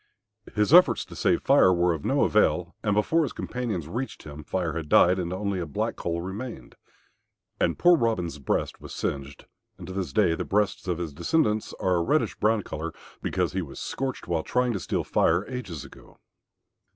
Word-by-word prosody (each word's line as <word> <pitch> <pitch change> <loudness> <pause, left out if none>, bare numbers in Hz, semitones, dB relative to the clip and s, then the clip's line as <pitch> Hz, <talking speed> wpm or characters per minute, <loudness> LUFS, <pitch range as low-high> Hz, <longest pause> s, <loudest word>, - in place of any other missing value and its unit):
His 105 +6 +2
efforts 160 - +6
to - - -12
save - - +1
Fire 95 - +5
were 90 -1 +2
of 75 -3 -6
no - - +2
avail, - - +2
and 105 - 0
before 160 +11 +2
his 150 - -2
companions 110 -11 -4
reached 125 +10 -5
him 75 0 -9
Fire 85 -1 -2
had 80 -2 -5
died, 90 +4 +5
and 85 -1 -3
only 100 0 -2
a 85 - -3
black 70 - -2
coal 85 0 -3
remained. 95 - -7 0.9
And - - +1
poor 175 0 +6
Robin's 95 - -1
breast 70 - -2
was - - -9
singed, 70 0 -4 0.3
and - - -9
to 95 - -7
this 95 -6 -3
day 90 +2 +3
the - - -2
breasts 105 -1 0
of 90 -2 0
his 85 -4 -4
descendants 110 - 0
are 90 -1 +2
a - - +1
reddish - - +1
brown 110 -1 +2
colour 80 0 -5 0.3
because - - -1
he 95 - -1
was 75 -6 -8
scorched 135 -1 -4
while 85 -2 0
trying 125 +6 0
to 100 - -2
steal - - -2
Fire 85 +5 +2
ages 95 - -6
ago. 70 - -16
95 Hz, 195 wpm, -26 LUFS, 85-110 Hz, 0.9 s, efforts